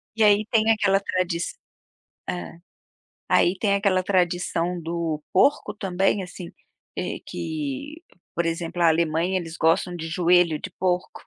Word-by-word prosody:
E 225 - +2
aí 210 0 +5
tem 225 -1 +4
aquela 205 -3 +3
tradi 185 -3 -1 0.9
hã. 175 -1 -5 0.7
Aí 180 +2 +3
tem 200 -1 +2
aquela 195 -2 +2
tradição 175 -1 0
do 165 -2 -3
porco 210 0 +3
também, 195 0 0
assim, 180 -1 -9 0.4
eh, - - -3
que 155 - -5 0.3
por 170 - 0
exemplo, 165 +1 -2
a 170 - +6
Alemanha 165 +3 +1
eles 165 -2 -7
gostam 165 +2 +2
de 165 -1 -5
joelho 170 -1 +3
de 185 - -6
porco 180 -1 -1
180 Hz, 140 wpm, -24 LUFS, 165-195 Hz, 0.9 s, a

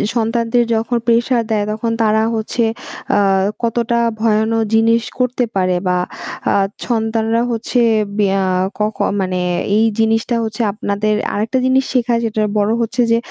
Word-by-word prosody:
সন্তানদের 230 +1 +1
যখন 230 +2 0
প্রেশার 235 +1 +2
দেয়, 210 -2 +1
তখন 230 +2 -2
তারা 220 0 +3
হচ্ছে 225 +2 -1 0.5
আ - - +4 0.4
কতটা 235 0 0 0.2
ভয়ানক 220 0 +1 0.2
জিনিস 225 +1 +3 0.2
করতে 250 0 +1
পারে 185 -1 +1
বা 180 0 +2 0.6
আ - - +2 0.3
সন্তানরা 225 0 0
হচ্ছে 235 +2 -1 0.4
বেয়া 195 -2 +2 0.3
ক - - -28 0.2
ক - - -24 0.2
মানে 185 -1 -1 0.4
এই 225 - +4
জিনিসটা 225 +2 +1
হচ্ছে 220 +1 -3
আপনাদের 210 0 -1 0.2
আরেকটা 220 +5 -1
জিনিস 260 +1 +3
শেখায় 240 -2 +1
যেটার 215 -1 0
বড়ো 210 +1 +2
হচ্ছে 230 +2 -1
যে 230 - +4
225 Hz, 145 wpm, -17 LUFS, 215-235 Hz, 0.6 s, আ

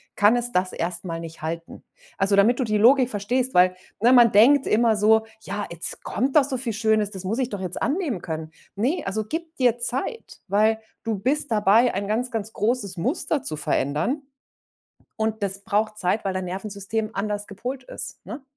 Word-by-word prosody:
kann 205 +3 +5
es 245 0 0
das 185 -2 0
erst 170 +2 -2
mal 165 -2 -4
nicht 165 -1 -9
halten. 165 +1 -6 0.4
Also, 195 +1 +4
damit 225 +6 +4
du - - +2
die 215 -3 0
Logik 255 +3 +5
verstehst, 245 +5 -1
weil, 180 0 +5 0.3
ne, 240 +3 +5
man 240 -3 +7
denkt 260 +7 +5
immer 225 0 +3
so: 220 +1 +4 0.2
„Ja, 205 0 -4
jetzt 170 0 -1
kommt 265 +6 -2
doch 300 - +7
so 265 -1 -2
viel 240 -2 -3
Schönes, 215 -1 +1
das 190 -2 -6
muss 215 +7 -2
ich 255 -2 0
doch 205 -4 -5
jetzt 185 -2 -4
annehmen 280 - -1
können.“ 160 -1 -5 0.2
Ne, 255 - 0
also, 215 +3 -2
gib 325 +6 -5
dir 245 -2 +2
Zeit. 265 - -4
Weil 215 +3 +2 0.2
du 225 -2 -2
bist 275 +8 0
dabei, 220 +3 +4
ein 200 +1 -2
ganz, 235 +4 -1
ganz 220 -1 -3
großes 210 -4 -1
Muster 275 - 0
zu 155 - -3
verändern. 150 - -1 1.0
Und 220 0 -2
das 195 0 -1
braucht 215 0 -1
Zeit, 190 +3 0
weil 190 - -1
dein 185 -1 -3
Nervensystem 200 +3 -4
anders 205 +1 -2
gepolt 250 +6 -6
ist, - - -7
ne? 285 - -7
215 Hz, 195 wpm, -24 LUFS, 195-245 Hz, 1.0 s, man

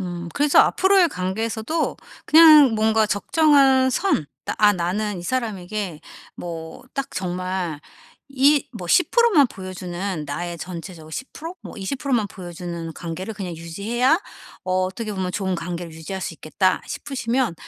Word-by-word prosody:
음 175 -2 -5
그래서 290 0 +3
앞으로의 380 -2 +5
관계에서도 220 - -2 0.3
그냥 305 -6 +8
뭔가 220 0 +3
적정한 270 +3 +4
선 260 - +1 0.3
'아 210 -1 +6
나는 190 +3 -2
이 - - -7
사람에게 205 -6 -3 0.4
뭐 165 -2 -7
딱 275 - -2
정말 180 -3 -3 0.5
이 275 +2 +3
뭐 185 -6 -7
10% 470 - +4
만 290 -8 +5
보여 185 -2 -8
주는 180 -2 -4
나의 170 +4 -4
전체적으로 170 -2 -8
10% 320 - -7
뭐 - - -10
20% 270 +8 -4
만 220 -4 +1
보여 180 -2 -9
주는 170 -2 -6
관계를 180 +6 -6
그냥 180 -4 -6
유지해야 225 - 0 0.4
어 185 - -2
어떻게 210 +3 -4
보면 185 -2 -3
좋은 190 -2 -1
관계를 170 -1 -5
유지할 160 +4 -6
수 165 - -4
있겠다.' 185 +4 0
싶으시면 250 -6 -2
195 Hz, 285 characters per minute, -22 LUFS, 175-260 Hz, 0.5 s, 그냥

